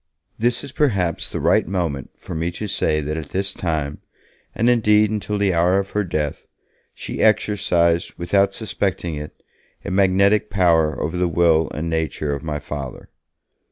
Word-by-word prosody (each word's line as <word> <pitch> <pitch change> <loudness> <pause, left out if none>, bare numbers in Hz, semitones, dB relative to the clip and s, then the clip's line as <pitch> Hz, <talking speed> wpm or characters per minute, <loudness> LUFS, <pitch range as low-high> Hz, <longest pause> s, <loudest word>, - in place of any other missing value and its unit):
This 120 +2 +1
is 140 - -8
perhaps 100 - 0
the - - -4
right - - +3
moment 85 -8 -2
for - - -8
me 80 +1 -1
to 105 - -5
say 80 -6 0
that 75 +2 -3
at 75 -3 -6
this 95 +1 -1
time, 75 -4 -2 0.6
and 115 - +1
indeed 105 -3 +4
until 105 -1 -2
the 100 -2 +2
hour 85 +3 +3
of 100 0 -2
her 105 - 0
death, 75 -5 -3 0.4
she - - -6
exercised, 90 -6 +2
without 100 +3 +1
suspecting 95 -6 -2
it, 75 0 -8 0.4
a - - -3
magnetic 100 +2 +3
power 85 -5 +2
over 80 +3 -2
the 90 0 +2
will 80 -1 +3
and 80 +2 -4
nature 80 -2 -1
of 70 - -4
my 75 -1 -3
Father. 70 -2 -7
90 Hz, 165 wpm, -21 LUFS, 80-100 Hz, 0.6 s, indeed